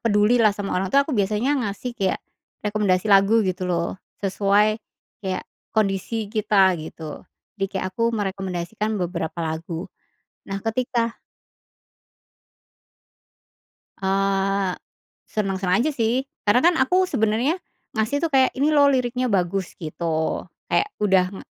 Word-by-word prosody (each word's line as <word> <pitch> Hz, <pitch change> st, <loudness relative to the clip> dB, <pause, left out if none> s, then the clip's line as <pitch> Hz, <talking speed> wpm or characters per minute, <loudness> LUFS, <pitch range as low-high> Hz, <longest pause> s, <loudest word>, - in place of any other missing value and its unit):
peduli 220 Hz, +2 st, +3 dB
lah 215 Hz, -3 st, +4 dB
sama 200 Hz, -1 st, -3 dB
orang 190 Hz, +1 st, -1 dB
tuh 280 Hz, +7 st, +4 dB
aku 295 Hz, -, -4 dB
biasanya 215 Hz, +5 st, +1 dB
ngasih 220 Hz, +2 st, -3 dB
kayak 195 Hz, -5 st, 0 dB, 0.5 s
rekomendasi 205 Hz, -1 st, +2 dB
lagu 205 Hz, +3 st, +5 dB
gitu 185 Hz, 0 st, -2 dB
loh, 170 Hz, +1 st, -1 dB, 0.2 s
sesuai 205 Hz, +2 st, +2 dB, 0.4 s
kayak 190 Hz, -2 st, -3 dB, 0.3 s
kondisi 210 Hz, +1 st, 0 dB
kita 200 Hz, -3 st, +4 dB
gitu. 155 Hz, -1 st, -8 dB, 0.4 s
Jadi 195 Hz, -, +2 dB
kayak 185 Hz, 0 st, -2 dB
aku 230 Hz, +4 st, +1 dB
merekomendasikan 195 Hz, +1 st, -2 dB
beberapa 175 Hz, -3 st, -3 dB
lagu. 160 Hz, +2 st, -4 dB, 0.6 s
Nah 195 Hz, 0 st, -4 dB
ketika 235 Hz, 0 st, -1 dB, 2.8 s
Eee, 195 Hz, 0 st, +1 dB, 0.5 s
seneng-seneng 195 Hz, -2 st, 0 dB
aja 310 Hz, +6 st, +2 dB
sih, 250 Hz, +2 st, 0 dB, 0.2 s
karena 215 Hz, +4 st, +4 dB
kan 345 Hz, +4 st, +5 dB
aku 365 Hz, +8 st, +3 dB
sebenarnya 225 Hz, +8 st, +1 dB, 0.4 s
ngasih 220 Hz, +7 st, +1 dB
tuh 335 Hz, -, +1 dB
kayak, 265 Hz, -3 st, +4 dB
"Ini 280 Hz, +3 st, +1 dB
loh 285 Hz, -1 st, +6 dB
liriknya 255 Hz, -1 st, 0 dB
bagus" 185 Hz, 0 st, 0 dB
gitu, 160 Hz, 0 st, -2 dB, 0.2 s
kayak 415 Hz, -, +1 dB
udah 190 Hz, -3 st, +4 dB
ng 195 Hz, -, -8 dB
205 Hz, 125 wpm, -23 LUFS, 190-230 Hz, 2.8 s, loh